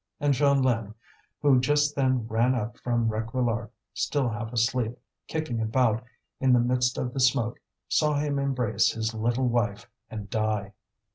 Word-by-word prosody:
And 145 Hz, 0 st, +2 dB
Jeanlin, 130 Hz, -6 st, +2 dB, 0.5 s
who 140 Hz, -3 st, +5 dB
just 145 Hz, +2 st, +2 dB
then 130 Hz, -4 st, +1 dB
ran 120 Hz, +3 st, +2 dB
up 120 Hz, 0 st, -3 dB
from 120 Hz, -2 st, 0 dB
Réquillart 115 Hz, +1 st, -1 dB, 0.2 s
still 140 Hz, -4 st, 0 dB
half 110 Hz, +1 st, -5 dB
asleep, 120 Hz, 0 st, 0 dB, 0.3 s
kicking 155 Hz, -8 st, -2 dB
about 115 Hz, +1 st, +1 dB, 0.4 s
in 130 Hz, -1 st, +3 dB
the 125 Hz, -, +5 dB
midst 125 Hz, +1 st, +1 dB
of 125 Hz, -1 st, -3 dB
the -, -, -3 dB
smoke, 125 Hz, -3 st, +2 dB, 0.3 s
saw 150 Hz, -1 st, +2 dB
him 145 Hz, -1 st, 0 dB
embrace 130 Hz, -5 st, +1 dB
his 110 Hz, 0 st, -2 dB
little 120 Hz, +3 st, 0 dB
wife 115 Hz, -2 st, -1 dB, 0.2 s
and 105 Hz, -2 st, -6 dB
die. 105 Hz, -1 st, -1 dB
120 Hz, 150 wpm, -27 LUFS, 115-130 Hz, 0.5 s, who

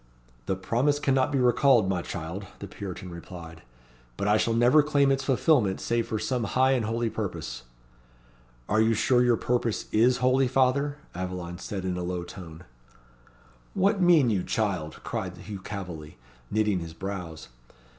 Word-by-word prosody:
"The 95 Hz, -, +1 dB
promise 120 Hz, +10 st, +1 dB
cannot 135 Hz, -1 st, +1 dB
be 140 Hz, -, +1 dB
recalled, 125 Hz, -3 st, +4 dB
my 95 Hz, -2 st, 0 dB
child," 85 Hz, +4 st, -6 dB
the -, -, -7 dB
Puritan 95 Hz, -2 st, -7 dB
replied. 85 Hz, -1 st, -10 dB, 0.6 s
"But 100 Hz, -, -1 dB
I 105 Hz, -, +4 dB
shall 115 Hz, +1 st, +1 dB
never 120 Hz, +6 st, +5 dB
claim 145 Hz, -2 st, +2 dB
its 135 Hz, 0 st, 0 dB
fulfilment 130 Hz, -, +2 dB
save 115 Hz, 0 st, -1 dB
for 110 Hz, -, -2 dB
some 120 Hz, +3 st, -1 dB
high 130 Hz, +5 st, +2 dB
and 125 Hz, -4 st, +1 dB
holy 115 Hz, +1 st, -1 dB
purpose." 85 Hz, -, -5 dB, 1.0 s
"Are 110 Hz, +2 st, +2 dB
you 110 Hz, +1 st, +3 dB
sure 120 Hz, +3 st, +3 dB
your 120 Hz, -2 st, +3 dB
purpose 120 Hz, -2 st, -1 dB
is 120 Hz, +3 st, +4 dB
holy, 130 Hz, +1 st, +3 dB
father?" 135 Hz, +3 st, +1 dB, 0.2 s
Aveline 90 Hz, -1 st, -5 dB
said 95 Hz, -1 st, -5 dB
in 90 Hz, -1 st, -2 dB
a 90 Hz, -, -3 dB
low 90 Hz, 0 st, -3 dB
tone. 85 Hz, -2 st, -10 dB, 1.1 s
"What 195 Hz, +1 st, +2 dB
mean 165 Hz, -9 st, +5 dB
you, 100 Hz, -4 st, +1 dB
child?" 90 Hz, -8 st, -2 dB
cried -, -, -4 dB
Hugh 100 Hz, -2 st, -8 dB
Calveley, 90 Hz, -7 st, -7 dB, 0.3 s
knitting 105 Hz, -3 st, +1 dB
his 85 Hz, -1 st, -8 dB
brows. 90 Hz, -4 st, -6 dB
110 Hz, 160 wpm, -27 LUFS, 90-130 Hz, 1.1 s, never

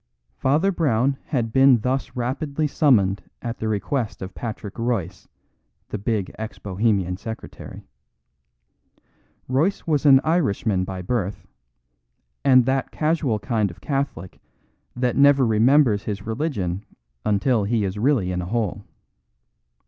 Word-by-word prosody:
Father 155 Hz, +9 st, +2 dB
Brown 135 Hz, -, +1 dB
had 115 Hz, -6 st, -2 dB
been 135 Hz, -3 st, +5 dB
thus 130 Hz, +3 st, -2 dB
rapidly 140 Hz, +5 st, -2 dB
summoned 110 Hz, -10 st, +3 dB, 0.2 s
at 115 Hz, -1 st, -5 dB
the 110 Hz, -, -2 dB
request 110 Hz, +1 st, -2 dB
of 95 Hz, +1 st, -7 dB
Patrick 110 Hz, -2 st, -6 dB
Royce, 105 Hz, -6 st, -2 dB, 0.6 s
the 105 Hz, -, -4 dB
big 105 Hz, -2 st, -1 dB
ex 110 Hz, 0 st, -6 dB
Bohemian 95 Hz, -2 st, 0 dB
secretary. 110 Hz, +3 st, -9 dB, 1.6 s
Royce 150 Hz, +10 st, 0 dB
was 150 Hz, -2 st, +1 dB
an 135 Hz, -1 st, +8 dB
Irishman 110 Hz, -, +1 dB
by 95 Hz, -1 st, -6 dB
birth; 100 Hz, -1 st, -2 dB, 1.0 s
and 130 Hz, -3 st, +6 dB
that 135 Hz, 0 st, 0 dB
casual 155 Hz, -7 st, 0 dB
kind 105 Hz, 0 st, -1 dB
of 85 Hz, -, -12 dB
Catholic 135 Hz, -, -3 dB, 0.6 s
that 125 Hz, -1 st, 0 dB
never 140 Hz, -1 st, +5 dB
remembers 115 Hz, 0 st, +4 dB
his 100 Hz, -2 st, -4 dB
religion 110 Hz, -, -2 dB, 0.4 s
until 105 Hz, +1 st, +1 dB
he 110 Hz, 0 st, +1 dB
is 100 Hz, +1 st, -3 dB
really 115 Hz, -7 st, +2 dB
in 90 Hz, 0 st, -2 dB
a -, -, -5 dB
hole. 105 Hz, -2 st, -2 dB
115 Hz, 125 wpm, -23 LUFS, 100-135 Hz, 1.6 s, an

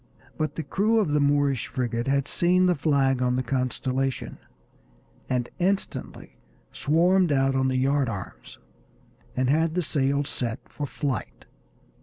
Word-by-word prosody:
But 155 Hz, 0 st, -2 dB
the 160 Hz, -, -3 dB
crew 215 Hz, +7 st, +1 dB
of 195 Hz, -9 st, +1 dB
the 150 Hz, -, +2 dB
Moorish 140 Hz, -3 st, +2 dB
frigate 120 Hz, -2 st, -2 dB
had 140 Hz, 0 st, +1 dB
seen 180 Hz, +1 st, +3 dB
the 180 Hz, -, +4 dB
flag 140 Hz, -4 st, +1 dB
on 125 Hz, 0 st, +1 dB
the 130 Hz, -, 0 dB
Constellation, 130 Hz, +1 st, -2 dB, 0.9 s
and 125 Hz, -2 st, 0 dB
instantly 190 Hz, +2 st, -2 dB, 0.3 s
swarmed 175 Hz, +3 st, +2 dB
out 135 Hz, -1 st, +2 dB
on 130 Hz, 0 st, +1 dB
the 130 Hz, 0 st, 0 dB
yard 135 Hz, 0 st, +2 dB
arms, -, -, -8 dB, 0.8 s
and 130 Hz, 0 st, +1 dB
had 160 Hz, +4 st, +2 dB
the 180 Hz, -, +1 dB
sails 140 Hz, -1 st, 0 dB
set 120 Hz, -1 st, -3 dB
for 145 Hz, -, -5 dB
flight. 140 Hz, -1 st, -4 dB
140 Hz, 145 wpm, -25 LUFS, 130-155 Hz, 0.9 s, the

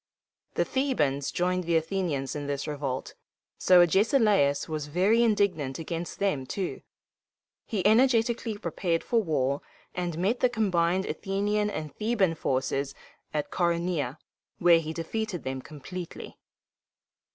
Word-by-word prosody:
The -, -, +2 dB
Thebans 150 Hz, -, 0 dB
joined 180 Hz, 0 st, 0 dB
the 170 Hz, 0 st, +1 dB
Athenians 160 Hz, -6 st, -2 dB
in 145 Hz, -1 st, -4 dB
this 140 Hz, 0 st, -2 dB
revolt, 140 Hz, -3 st, -3 dB, 0.5 s
so 180 Hz, -1 st, +7 dB
Agesilaus 195 Hz, -, +3 dB
was 155 Hz, -2 st, -4 dB
very 190 Hz, +9 st, +3 dB
indignant 200 Hz, -, +1 dB
against 165 Hz, +1 st, -5 dB
them 150 Hz, -10 st, 0 dB
too. 190 Hz, +4 st, -3 dB, 0.9 s
He 200 Hz, -5 st, -2 dB
energetically 230 Hz, -1 st, +3 dB
prepared 170 Hz, -3 st, -1 dB
for 235 Hz, -2 st, +2 dB
war, 140 Hz, -6 st, 0 dB, 0.3 s
and 175 Hz, -3 st, -3 dB
met 205 Hz, +8 st, +1 dB
the 250 Hz, -, +3 dB
combined 190 Hz, -5 st, +1 dB
Athenian 205 Hz, +1 st, -1 dB
and 155 Hz, -7 st, -5 dB
Theban 210 Hz, -6 st, +1 dB
forces 135 Hz, -1 st, -1 dB, 0.4 s
at 150 Hz, -1 st, -2 dB
Coronea, 170 Hz, -5 st, 0 dB, 0.4 s
where 170 Hz, -1 st, +6 dB
he 160 Hz, -1 st, -4 dB
defeated 180 Hz, +4 st, -3 dB
them 130 Hz, 0 st, -4 dB
completely. 165 Hz, +5 st, -8 dB
175 Hz, 125 wpm, -28 LUFS, 150-205 Hz, 0.9 s, so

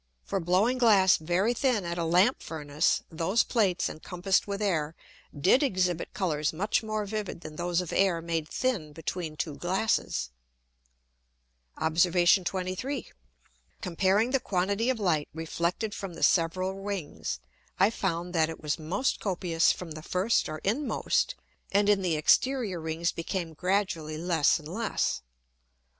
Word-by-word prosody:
For 195 Hz, -, -2 dB
blowing 190 Hz, +9 st, +2 dB
Glass 200 Hz, -6 st, +6 dB
very 175 Hz, +8 st, +1 dB
thin 245 Hz, -6 st, +1 dB
at 170 Hz, 0 st, -3 dB
a -, -, 0 dB
Lamp 180 Hz, +9 st, +3 dB
Furnace, 150 Hz, -2 st, 0 dB
those 170 Hz, +7 st, +1 dB
Plates 200 Hz, -7 st, +1 dB
encompassed 180 Hz, +5 st, -1 dB
with 200 Hz, 0 st, -3 dB
Air 165 Hz, -7 st, 0 dB, 0.4 s
did 195 Hz, -, +4 dB
exhibit 185 Hz, -, 0 dB
Colours 155 Hz, -5 st, 0 dB
much 195 Hz, +7 st, 0 dB
more 215 Hz, -1 st, -2 dB
vivid 210 Hz, -4 st, -4 dB
than 155 Hz, -2 st, -9 dB
those 175 Hz, +1 st, 0 dB
of 180 Hz, -, -6 dB
Air 190 Hz, -4 st, +3 dB
made 165 Hz, -2 st, -2 dB
thin 205 Hz, -13 st, -1 dB
between 160 Hz, 0 st, -5 dB
two 155 Hz, -1 st, -2 dB
Glasses. 185 Hz, -, 0 dB, 1.5 s
Obs. 160 Hz, +2 st, +3 dB, 0.4 s
23. 185 Hz, +10 st, -3 dB, 0.7 s
Comparing 195 Hz, +6 st, +2 dB
the 270 Hz, -, +3 dB
quantity 200 Hz, +1 st, 0 dB
of 255 Hz, -3 st, 0 dB
Light 165 Hz, -7 st, +1 dB
reflected 170 Hz, +6 st, -2 dB
from 190 Hz, -4 st, -6 dB
the -, -, -5 dB
several 185 Hz, +2 st, +2 dB
Rings, 145 Hz, -, -4 dB, 0.4 s
I 200 Hz, +3 st, +5 dB
found 175 Hz, -4 st, -2 dB
that 160 Hz, -2 st, +2 dB
it 160 Hz, -, -7 dB
was 150 Hz, 0 st, -2 dB
most 185 Hz, +12 st, -1 dB
copious 175 Hz, -4 st, +1 dB
from 180 Hz, -3 st, -6 dB
the 155 Hz, 0 st, -7 dB
first 185 Hz, +7 st, +1 dB
or 155 Hz, -, -4 dB
inmost, 250 Hz, +9 st, 0 dB, 0.4 s
and 200 Hz, +1 st, +3 dB
in 205 Hz, -1 st, +4 dB
the 175 Hz, -4 st, +1 dB
exterior 210 Hz, -, +2 dB
Rings 160 Hz, +2 st, -1 dB
became 165 Hz, 0 st, -4 dB
gradually 175 Hz, -3 st, -1 dB
less 165 Hz, -3 st, +2 dB
and 155 Hz, -2 st, -10 dB
less. 210 Hz, -, -1 dB
180 Hz, 145 wpm, -28 LUFS, 165-205 Hz, 1.5 s, Glass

